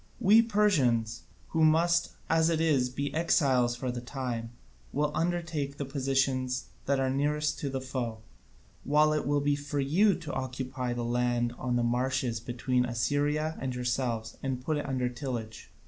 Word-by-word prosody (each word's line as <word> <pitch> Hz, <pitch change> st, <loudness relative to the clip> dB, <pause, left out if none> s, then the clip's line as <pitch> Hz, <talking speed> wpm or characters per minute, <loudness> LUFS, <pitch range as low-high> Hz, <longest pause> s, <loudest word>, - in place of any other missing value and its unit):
We 215 Hz, +4 st, +6 dB
Persians, 155 Hz, -, +2 dB, 0.3 s
who 160 Hz, -1 st, +1 dB
must, 170 Hz, +2 st, +3 dB
as 160 Hz, 0 st, +3 dB
it 165 Hz, -1 st, +1 dB
is, 145 Hz, -6 st, +2 dB
be 140 Hz, +3 st, -3 dB
exiles 135 Hz, -7 st, +2 dB
for 125 Hz, +1 st, -3 dB
the 120 Hz, 0 st, -5 dB
time, 120 Hz, -2 st, -4 dB, 0.4 s
will 150 Hz, +1 st, 0 dB
undertake 165 Hz, -5 st, -2 dB
the 140 Hz, -, -3 dB
positions 130 Hz, -1 st, 0 dB, 0.2 s
that 140 Hz, 0 st, +2 dB
are 130 Hz, -1 st, +1 dB
nearest 150 Hz, +2 st, 0 dB
to 140 Hz, -, -2 dB
the 135 Hz, 0 st, -2 dB
foe, 130 Hz, -4 st, -3 dB, 0.7 s
while 150 Hz, +1 st, +4 dB
it 150 Hz, -, -1 dB
will 145 Hz, 0 st, +2 dB
be 145 Hz, 0 st, +2 dB
for 145 Hz, 0 st, -4 dB
you 180 Hz, +10 st, +3 dB
to 160 Hz, -5 st, -7 dB
occupy 130 Hz, -1 st, -3 dB
the 120 Hz, -1 st, -3 dB
land 120 Hz, 0 st, 0 dB
on 125 Hz, -1 st, -1 dB
the 120 Hz, -, +2 dB
marches 125 Hz, -1 st, 0 dB
between 125 Hz, +2 st, 0 dB
Assyria 145 Hz, +6 st, 0 dB
and 130 Hz, -2 st, -2 dB
yourselves 120 Hz, -2 st, -2 dB
and 130 Hz, -2 st, -2 dB
put 155 Hz, -2 st, 0 dB
it 145 Hz, -, -3 dB
under 130 Hz, -2 st, 0 dB
tillage. 120 Hz, -3 st, -5 dB
135 Hz, 165 wpm, -29 LUFS, 125-150 Hz, 0.7 s, We